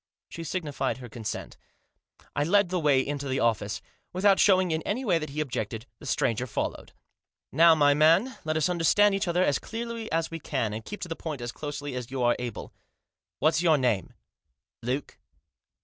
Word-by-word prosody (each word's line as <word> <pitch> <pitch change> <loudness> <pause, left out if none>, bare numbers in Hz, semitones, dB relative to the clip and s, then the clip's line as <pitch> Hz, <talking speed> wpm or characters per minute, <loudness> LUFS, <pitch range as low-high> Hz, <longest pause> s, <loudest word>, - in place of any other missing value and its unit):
She 165 - -7
signified 150 -6 -2
her 125 -1 -9
consent. 110 -1 -6 0.8
I 145 - +1
led 195 +3 +3
the 180 0 0
way 140 -4 +3
into 140 -1 -3
the 130 0 -1
office. 110 -3 0 0.3
Without 195 +2 +4
showing 185 -3 +4
in 160 0 0
any 245 +10 -2
way 175 -6 +3
that 155 - -5
he 145 +2 -5
objected, 115 -6 -3
the 150 - -10
stranger 125 0 0
followed. - - -4 0.3
" - - -67 0.2
Now 165 +3 +6
my 145 -2 +5
man, 165 - +4
let 155 0 -1
us 155 - +2
understand 180 +4 +3
each 195 0 -1
other 175 +1 +2
as 145 - +2
clearly 230 0 -5
as 165 0 0
we 165 - -5
can, 125 -8 -2
and 110 +1 -5
keep 210 - -8
to - - -4
the 165 - -4
point 155 -5 -5
as 120 0 -4
closely 145 +2 -6
as 125 -1 -5
you 130 -1 -2
are 120 0 +4
able. 125 -1 -6 0.6
What's 155 +1 +2
your 165 -3 +4
name 120 -8 0 0.3
?" - - -56
"Luke." 130 +4 -3
150 Hz, 195 wpm, -27 LUFS, 125-175 Hz, 0.8 s, Now